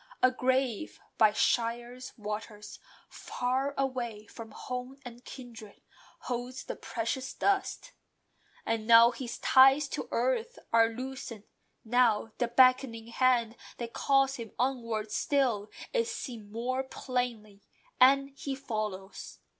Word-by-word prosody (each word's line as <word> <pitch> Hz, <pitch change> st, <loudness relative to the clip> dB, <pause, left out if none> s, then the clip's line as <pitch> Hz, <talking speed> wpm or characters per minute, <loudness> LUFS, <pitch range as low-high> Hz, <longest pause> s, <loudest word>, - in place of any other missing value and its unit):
A 255 Hz, -, +6 dB
grave 255 Hz, -3 st, -1 dB, 0.2 s
by 215 Hz, -1 st, +6 dB
Shire's 240 Hz, +3 st, -1 dB
Waters, 210 Hz, 0 st, -7 dB, 0.3 s
far 265 Hz, +3 st, -2 dB
away 245 Hz, -6 st, -2 dB
From 225 Hz, 0 st, -10 dB
home 250 Hz, +4 st, -6 dB
and 240 Hz, 0 st, -10 dB
kindred, 235 Hz, -6 st, -11 dB, 0.4 s
holds 250 Hz, +1 st, -4 dB
the -, -, -6 dB
precious 250 Hz, +3 st, -4 dB
dust. 400 Hz, +5 st, 0 dB, 0.7 s
And 225 Hz, -1 st, -2 dB
now 230 Hz, 0 st, +8 dB
his 245 Hz, -2 st, -6 dB
ties 270 Hz, +2 st, +6 dB
to -, -, -5 dB
earth -, -, 0 dB, 0.2 s
are 225 Hz, 0 st, +5 dB
loosened: 250 Hz, -2 st, -7 dB, 0.4 s
now, 225 Hz, -2 st, +2 dB
The 240 Hz, -, +1 dB
beckoning 240 Hz, -2 st, +3 dB
Hand 240 Hz, -2 st, +2 dB, 0.2 s
that 235 Hz, -1 st, -6 dB
calls 270 Hz, 0 st, +2 dB
him 230 Hz, -3 st, -8 dB
onwards 230 Hz, -4 st, -2 dB
still, 245 Hz, -8 st, +1 dB, 0.2 s
Is 465 Hz, -2 st, +1 dB
seen 230 Hz, -, -7 dB
more 250 Hz, +4 st, -2 dB
plainly, 245 Hz, -6 st, -4 dB, 0.4 s
and 275 Hz, +2 st, +5 dB
he 275 Hz, 0 st, -5 dB
follows. 215 Hz, -7 st, -5 dB
245 Hz, 120 wpm, -30 LUFS, 225-265 Hz, 0.7 s, now